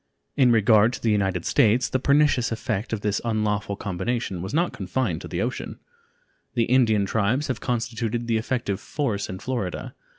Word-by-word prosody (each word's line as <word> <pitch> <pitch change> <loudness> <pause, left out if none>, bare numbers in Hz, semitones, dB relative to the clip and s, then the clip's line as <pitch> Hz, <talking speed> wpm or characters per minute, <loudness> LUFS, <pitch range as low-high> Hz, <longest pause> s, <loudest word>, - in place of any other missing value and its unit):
In 130 -3 +5
regard 110 +1 +5
to - - -5
the 115 - +3
United 95 -4 0
States, 115 +3 +3
the 130 - -1
pernicious 140 -3 +3
effect 110 -1 -3
of 110 -2 -2
this 105 0 0
unlawful 105 -3 -1
combination 100 0 -3
was 95 +3 -5
not 170 +5 +1
confined 95 -2 -2
to - - -7
the - - -2
ocean; - - -4 0.8
the 115 - +3
Indian 115 -4 +3
tribes 115 +9 0
have 130 - -2
constituted 120 -1 -2
the 115 -1 +1
effective 110 -4 -2
force 115 -9 -2
in 95 - -5
Florida. 110 -5 -4
115 Hz, 170 wpm, -24 LUFS, 100-125 Hz, 0.8 s, In